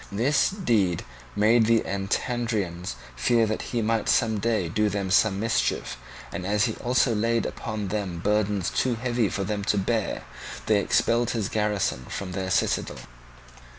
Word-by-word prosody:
This 125 +8 +2
deed 115 - 0 0.3
made 110 +2 +4
the 115 -1 +4
Antandrians 100 -2 -2 0.2
fear 115 - +3
that 110 0 -2
he 120 -3 -2
might 115 0 0
some 110 -3 +2
day 110 -4 0
do 105 +5 +1
them 100 -2 -2
some 95 0 +3
mischief; 115 +2 0 0.4
and 90 - -5
as 100 +2 +1
he - - -1
also 125 0 +2
laid 115 +2 +1
upon 105 -3 -4
them 100 -4 -3
burdens 105 0 0
too 125 -2 +1
heavy 120 -2 0
for 100 - -2
them 100 +1 -2
to 105 - +1
bear, 110 +2 -1 0.4
they 110 -2 +3
expelled 115 +3 +2
his 105 -3 -1
garrison 105 - -1
from 95 -2 -5
their 95 0 -3
citadel. 90 - 0
105 Hz, 155 wpm, -26 LUFS, 100-115 Hz, 0.4 s, made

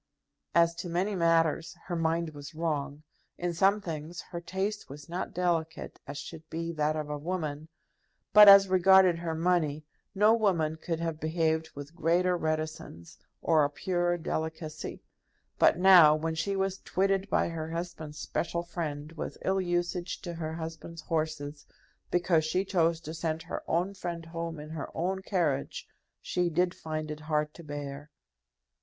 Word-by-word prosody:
As 170 0 +5
to 175 - -5
many 185 +5 0
matters 165 -2 +2
her 175 - -3
mind 165 0 0
was 145 +1 -10
wrong. 150 -2 -2 0.3
In 175 0 -2
some 195 +5 +3
things 165 -1 -6
her 170 -1 -4
taste 190 +5 -3
was 145 +1 -10
not 175 +2 -4
delicate 165 -3 -2
as 145 +1 -6
should 160 +1 -9
be 165 +1 -3
that 155 -1 0
of 155 -1 -3
a 150 0 -4
woman. 155 -2 -3 0.7
But, 210 -1 +11
as 195 0 +9
regarded 185 -1 +5
her 165 -1 -3
money, 160 -3 +1 0.3
no 210 +3 +5
woman 170 -9 +1
could 165 0 -3
have 165 -2 -2
behaved 160 0 0
with 145 +2 -8
greater 175 +2 +2
reticence, 155 - -4 0.2
or 160 -2 +4
a 145 - +2
purer 175 +3 0
delicacy. 160 -1 -4 0.6
But - - +5
now, 180 -5 +8
when 160 +1 -2
she 195 +5 -1
was 195 0 -1
twitted 195 +1 0
by - - +2
her 160 -1 -4
husband's 165 -3 -5
special 170 +2 -2
friend 155 -3 -5
with 165 - -6
ill 190 0 +2
usage 175 0 -2
to 175 - -5
her 160 -1 -4
husband's 165 0 -7
horses, 155 -3 -3 0.4
because 175 -2 +2
she 180 +5 0
chose 170 -4 +2
to 160 -1 -7
send 165 -1 -2
her - - -5
own 180 +4 0
friend 175 -3 -5
home 165 -1 -5
in 150 +1 -9
her 160 -3 -5
own 190 +3 -1
carriage, 170 -9 -1 0.4
she 180 -1 0
did 175 +2 +1
find 155 -1 -5
it 150 - -6
hard 150 -1 -1
to 170 - -12
bear. 145 -1 -6
165 Hz, 160 wpm, -29 LUFS, 155-175 Hz, 0.7 s, But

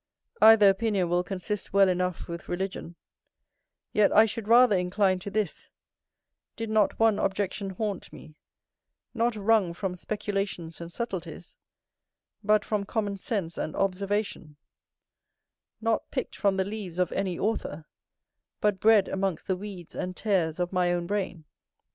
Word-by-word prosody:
Either 220 -2 +8
opinion 195 -2 +2
will 175 +1 +2
consist 195 +2 -4
well 200 -1 +6
enough 180 -1 -1
with 170 0 -7
religion: 180 -2 -4 1.0
yet 210 -1 +4
I 220 - +7
should 220 -1 -5
rather 235 -1 +6
incline 185 +1 +1
to 190 - -6
this, 200 -4 -3 0.9
did 225 -1 -4
not 215 -2 +2
one 225 -2 +4
objection 195 0 -1
haunt 200 0 -4
me, 155 - -13 0.8
not 235 -1 +1
wrung 210 -4 +2
from 185 +1 -3
speculations 195 -4 -4
and 170 0 -7
subtleties, 175 -6 -6 0.9
but 210 0 +3
from 210 -2 -1
common 205 -1 -2
sense 190 -4 -3
and 155 - -3
observation; 195 -4 -2 1.3
not 225 0 0
pick'd - - -4
from 200 -2 +1
the 190 - +1
leaves 200 -4 -6
of 180 -1 +1
any 190 -3 -2
author, 165 -8 -2 0.7
but 205 -2 +1
bred 215 -2 +5
amongst 190 -3 -2
the 190 - 0
weeds 185 -3 -9
and 180 0 -4
tares 180 -6 0
of 180 +1 -2
my 180 -1 +2
own 175 -1 -1
brain. 185 -4 -3
195 Hz, 140 wpm, -27 LUFS, 180-210 Hz, 1.3 s, Either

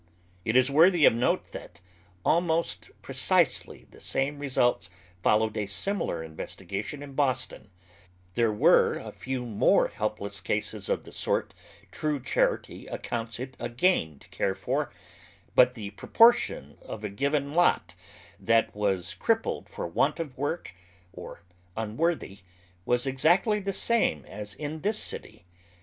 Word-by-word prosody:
It 115 +2 +3
is 130 +2 +4
worthy 165 +2 +6
of - - +7
note 120 +2 0
that 85 - -10 0.5
al 170 - +4
most 165 -1 -1
precisely - - +1
the - - -15
same 140 +2 -1
results 125 -9 +1 0.3
followed 110 +3 +2
a 105 -1 -2
similar 100 - -1
investi 80 +3 -8
gation 110 - -4
in 140 -1 -10
Boston, 130 -6 -1 0.6
There 115 0 +2
were 105 - +4
a - - -7
few 130 -1 -4
more 110 -4 +3
helpless 100 -2 -3
eases 105 - -1
of - - 0
the - - -13
sort - - -1 0.4
true 150 -2 -1
charity 130 - -1
accounts 115 0 -4
it 130 +1 -6
a - - -3
gain 120 - +1
to - - -18
care 95 - -1
for, - - -2 0.6
but 125 0 +5
the 105 -4 -6
proportion 230 - +3
of 110 - -8
a - - -1
given 140 +6 -1
lot 175 +2 +2 0.5
that 115 0 +2
was 95 -3 -1
crippled 225 - -1
for - - -5
want - - 0
of 150 -6 -5
work, 145 - -3 0.4
or - - -10 0.3
unworthy, 110 - -1 0.5
was 120 +1 +1
exactly 175 - +3
the 200 0 -3
same 195 - +1
as 105 0 -7
in 155 +4 -5
this 210 +3 +1
city. 90 - -3
130 Hz, 145 wpm, -27 LUFS, 105-155 Hz, 0.6 s, of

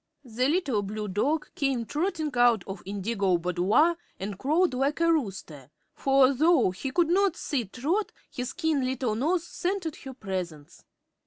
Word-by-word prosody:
The 250 +2 0
little 290 - +1
blue 210 +1 -4
dog 270 +11 -1
came 270 -8 -1
trotting 315 - -2
out 240 -5 +4
of 195 -1 -7
Indigo's 200 -2 0
boudoir 185 - +2 0.2
and 195 0 -5
crowed 320 +4 +2
like 275 +4 0
a 335 0 +4
rooster, 190 - -4 0.2
for 270 0 +3
although 280 - +3
he 190 +9 -5
could 335 +4 +2
not 380 0 +3
see 265 -7 -2
Trot 300 - -1 0.2
his 250 0 -4
keen 320 -6 0
little 255 -3 -1
nose 320 +10 0
scented 355 -4 -3
her 265 -2 -9
presence. 180 - -6
260 Hz, 155 wpm, -27 LUFS, 205-320 Hz, 0.2 s, out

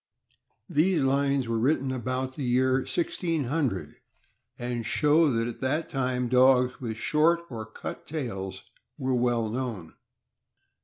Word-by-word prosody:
These 160 0 +2
lines 140 -1 +1
were 115 -1 0
written 135 +1 +1
about 130 +1 -3
the - - -6
year 130 +1 +3
1600, 150 - -2 0.6
and 120 -1 -3
show 150 +5 +3
that 115 -1 0
at 120 - -7
that 145 +5 -1
time 125 -2 0
dogs 125 0 +4
with 115 -3 -4
short 160 +7 +2
or 110 -2 -6
cut 110 - -8
tails 95 -11 -5 0.3
were 130 -2 -1
well 120 -2 +1
known. 110 -7 -4
130 Hz, 125 wpm, -27 LUFS, 120-140 Hz, 0.6 s, dogs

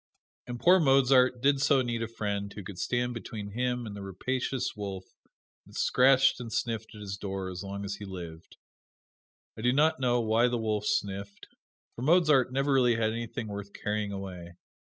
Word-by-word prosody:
And 120 -1 -5
poor 180 +6 +6
Mozart 135 -3 +4
did 140 -1 +3
so 135 -2 +4
need 120 -1 -2
a 115 - -2
friend 100 -3 -3
who 105 - -8
could 90 -1 -9
stand 125 +4 -1
between 110 -3 -7
him 125 +2 -1
and 105 -2 -7
the 100 - -7
rapacious 125 +7 -3
wolf 100 -3 -5 0.6
that - - -16
scratched 130 +1 +4
and 120 -2 -7
sniffed 115 -1 -3
at 105 - -10
his 100 -1 -5
door 95 -1 -4
as 90 - -6
long 100 0 -5
as 100 0 -4
he 105 - -8
lived. 85 -4 -9 1.0
I - - -8
do 125 +2 +3
not 150 +2 +3
know 120 -2 +2
why 115 +1 +3
the 120 0 -1
wolf 105 -2 -1
sniffed, 100 0 -2 0.5
for - - -8
Mozart 155 -3 +4
really 135 -2 +3
never - - -2
had 110 0 +1
anything 115 0 -5
worth 100 -1 -7
carrying 105 -1 -2
away. 90 -3 -7
115 Hz, 185 wpm, -29 LUFS, 100-125 Hz, 1.0 s, poor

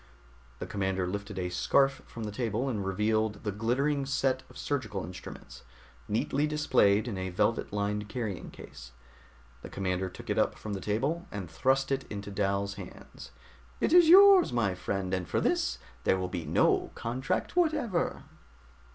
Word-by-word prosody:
The - - -5
commander 95 -2 -1
lifted 100 +2 -5
a 90 -1 -2
scarf 135 +10 +2
from 115 - -7
the 105 - -4
table 115 +2 -2
and 110 -7 -2
revealed 105 +2 0
the 105 - -1
glittering 135 +7 0
set 135 -1 +1
of - - -14
surgical 110 -9 -3
instruments, 90 +2 -10 0.5
neatly 135 +7 0
displayed 110 -8 +3
in 100 -5 -4
a 95 0 -3
velvet 105 +5 0
lined 105 0 -2
carrying 110 -7 -4
case. - - -12 0.7
The - - -9
commander 95 -1 -2
took - - -7
it - - +1
up - - +1
from 105 - -6
the 95 - -4
table 135 - -1
and 100 -3 -5
thrust 135 +11 +1
it 135 0 0
into 100 0 -6
Dal's 100 0 -1
hands. 90 - -11 0.5
"It - - +1
is 350 -2 +7
yours, 390 +1 +8
my 110 -6 +1
friend. 95 +1 -3
And 90 -2 -1
for - - 0
this, - - 0 0.3
there 95 - +3
will 90 -1 -3
be 85 -3 -4
no - - +2
contract 130 - -2
whatever." 305 - 0
105 Hz, 165 wpm, -29 LUFS, 95-135 Hz, 0.7 s, yours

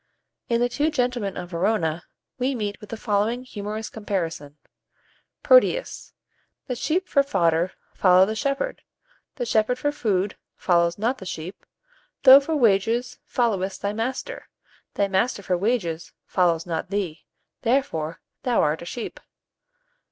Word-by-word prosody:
In 235 0 +2
the 245 - +4
"Two 290 +5 0
Gentlemen 245 -8 -1
of 180 0 -6
Verona," 170 -2 0 0.3
we 260 +2 0
meet 205 -3 -4
with 210 - -11
the 225 - -5
following 220 +3 0
humorous 215 -2 -5
comparison: 165 -9 -4 0.9
"Proteus. - - +3 0.5
The 255 - -3
sheep 340 +9 -1
for 280 - +4
fodder 170 -9 +1 0.2
follow 185 0 +5
the 215 - -2
shepherd, 275 - -2 0.5
the 245 - -3
shepherd 225 +2 +2
for 290 +3 0
food 205 -8 -1 0.2
follows 170 -1 +2
not 235 +5 0
the 190 - -8
sheep: 175 +3 -7 0.6
thou 265 0 +11
for 310 +3 -2
wages 230 0 +2
followest 195 -6 -1
thy 200 0 0
master, 250 - -4 0.5
thy 200 - +2
master 200 +2 0
for 185 - +1
wages 175 -5 -1
follows 170 -3 +1
not 170 +1 -3
thee; 185 -6 -3 0.4
therefore, 225 - 0 0.2
thou 245 -2 +2
art 150 +1 0
a - - -7
sheep. 230 +6 -6
210 Hz, 140 wpm, -24 LUFS, 180-250 Hz, 0.9 s, thou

